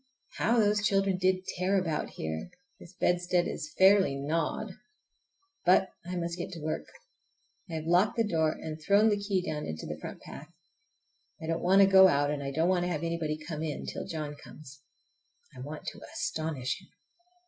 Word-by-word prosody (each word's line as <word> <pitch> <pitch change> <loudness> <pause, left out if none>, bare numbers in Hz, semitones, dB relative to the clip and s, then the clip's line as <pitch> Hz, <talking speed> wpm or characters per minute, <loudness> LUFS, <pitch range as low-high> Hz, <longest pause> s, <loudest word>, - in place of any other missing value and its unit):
How 235 +2 +2
those 210 -1 +3
children 195 -2 +2
did 185 0 +1
tear 190 +2 +2
about 165 -4 -2
here! 80 - -5 0.3
This 175 +2 -14
bedstead 175 0 +1
is 150 - -5
fairly 190 -6 +5
gnawed! 150 +4 -2 0.9
But 185 +2 +4
I 180 +1 -5
must 170 0 -3
get 175 - -4
to 170 - -7
work. 155 +1 -3 0.8
I - - -7
have 155 -1 -4
locked 180 +5 +3
the 230 -2 +2
door 160 -5 +2
and 155 0 -7
thrown 205 +6 +4
the 205 -1 +1
key 200 -2 -1
down 150 -1 -3
into 80 0 -5
the - - -6
front - - -7
path. - - -10 0.9
I - - -7
don't 165 +1 -1
want 190 +2 +5
to - - +6
go 190 -1 +8
out, 145 -4 +2
and 145 -1 -3
I 140 - -3
don't 160 +5 +1
want 180 -1 +2
to 180 - -1
have 155 -1 -2
anybody 165 -2 -2
come 155 0 -6
in, 155 -2 -4
till - - -5
John 155 -2 -4
comes. 140 -2 -13 0.7
I - - -11
want 150 +4 -7
to - - -6
astonish 160 - -2
him. 185 - -20
170 Hz, 190 wpm, -29 LUFS, 155-190 Hz, 0.9 s, go